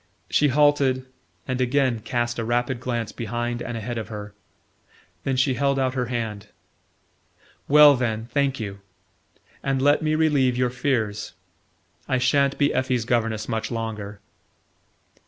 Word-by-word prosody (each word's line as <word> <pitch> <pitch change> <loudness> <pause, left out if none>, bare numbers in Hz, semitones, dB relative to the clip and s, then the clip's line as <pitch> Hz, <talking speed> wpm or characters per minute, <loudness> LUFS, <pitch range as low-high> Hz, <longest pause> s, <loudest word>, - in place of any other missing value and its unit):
She 150 - +4
halted, 140 -2 +3 0.4
and 130 0 -1
again 130 -2 +1
cast 120 +2 -2
a - - -1
rapid 120 +2 -1
glance 120 -3 -3
behind 120 +1 -3
and 120 -1 -4
ahead 115 +1 -4
of 110 - -6
her. 105 -2 -8 0.9
Then 135 - 0
she 130 +1 +2
held 140 +1 +1
out 130 -1 +1
her 125 -2 -1
hand. 110 -4 -4 1.2
"Well, 150 0 +8
then, 115 -3 -2
thank 140 -2 +1
you 100 -3 -5 0.8
and 135 -1 0
let 145 +2 +3
me 155 0 +1
relieve 145 -6 +2
your 125 -1 +1
fears. 115 -5 -2 0.7
I 130 - +1
sha'n't 140 +2 +2
be 145 0 +2
Effie's 130 -3 0
governess 115 -2 0
much 110 0 -2
longer." 105 -3 -5
125 Hz, 140 wpm, -24 LUFS, 115-135 Hz, 1.2 s, Well